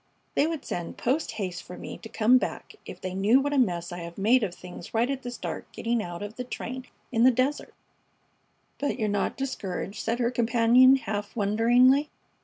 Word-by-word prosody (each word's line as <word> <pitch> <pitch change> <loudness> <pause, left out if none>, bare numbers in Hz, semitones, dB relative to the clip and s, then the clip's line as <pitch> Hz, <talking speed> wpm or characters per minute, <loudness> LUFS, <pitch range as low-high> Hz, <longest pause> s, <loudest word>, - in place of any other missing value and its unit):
They 295 - +3
would 320 -3 -4
send 175 -1 -5
post 265 0 0
haste 185 -5 -4
for 180 - -10
me - - -7
to 225 - -10
come 235 +4 +4
back - - -5
if - - -8
they 185 -1 -5
knew 205 +7 +4
what 285 +1 -1
a 280 - +3
mess 175 -7 0
I 175 - -5
have 170 0 -8
made 230 +6 +4
of 190 -5 -2
things 180 +2 -10
right 230 +2 +3
at 270 -1 -3
the 245 - -5
start 245 - -6
getting 235 0 -1
out 175 -1 -6
of 205 +2 -8
the 250 - -3
train 255 +1 -6 0.2
in 230 -2 +2
the 255 - +8
desert." 260 +4 -1 1.0
"But 285 - -1
you're 220 -4 0
not 205 -1 -1
discouraged?" 210 -6 -4
said 230 +1 -1
her 240 -1 +1
companion, 240 +2 +5
half 205 -5 -4
wonderingly. 240 +7 +4
230 Hz, 205 wpm, -27 LUFS, 200-255 Hz, 1.0 s, the